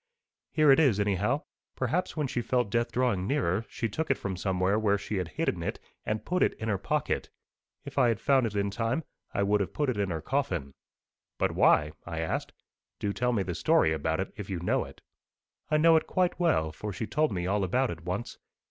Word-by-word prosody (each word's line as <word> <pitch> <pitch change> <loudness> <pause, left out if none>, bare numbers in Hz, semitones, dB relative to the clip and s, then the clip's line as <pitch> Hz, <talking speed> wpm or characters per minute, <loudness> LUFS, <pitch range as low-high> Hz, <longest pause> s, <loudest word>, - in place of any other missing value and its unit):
Here 155 -2 +5
it 135 - +6
is, 130 -10 +4
anyhow. 105 - +1 0.3
Perhaps 165 +9 -1
when 150 - +1
she 125 -2 -2
felt 125 -3 0
death 120 +1 +1
drawing 120 -7 +1
nearer, 115 -7 0
she 115 - -2
took 155 +9 -3
it 140 - +3
from 95 -1 -4
somewhere 95 +2 +1
where 100 -2 +2
she 100 +1 -4
had 90 -3 -1
hidden 80 - -2
it, - - -3 0.3
and 110 0 -2
put 180 0 0
it - - +3
in 110 - -4
her 100 -3 0
pocket. 150 +8 -1 0.6
If 140 0 -3
I 125 - +5
had 115 -2 +1
found 135 -2 +3
it 105 - -6
in 100 0 0
time, 115 +8 -1 0.3
I 100 - 0
would 105 +1 +2
have 95 - -3
put 145 -3 0
it 115 - -5
in 100 -2 0
her 80 -2 -2
coffin.' 85 - -2 0.6
'But - - +1
why?' 75 0 +4
I 85 -1 -6
asked. 80 0 -2 0.5
'Do 100 -1 -2
tell 125 +2 +1
me 105 -5 +1
the 90 - -3
story 80 0 +3
about 80 +2 -1
it, 95 - -3
if 100 -3 -7
you 95 -3 -2
know 90 - 0
it.' - - -14 0.7
'I 155 - +3
know 165 +1 +6
it - - -1
quite 185 -1 +1
well, 120 - +2
for 105 +6 -6
she 110 - -4
told 155 +4 +1
me 90 -3 -2
all 100 +2 +1
about 125 +8 +1
it 85 0 -8
once. 95 +7 -4
105 Hz, 225 wpm, -29 LUFS, 95-135 Hz, 0.7 s, it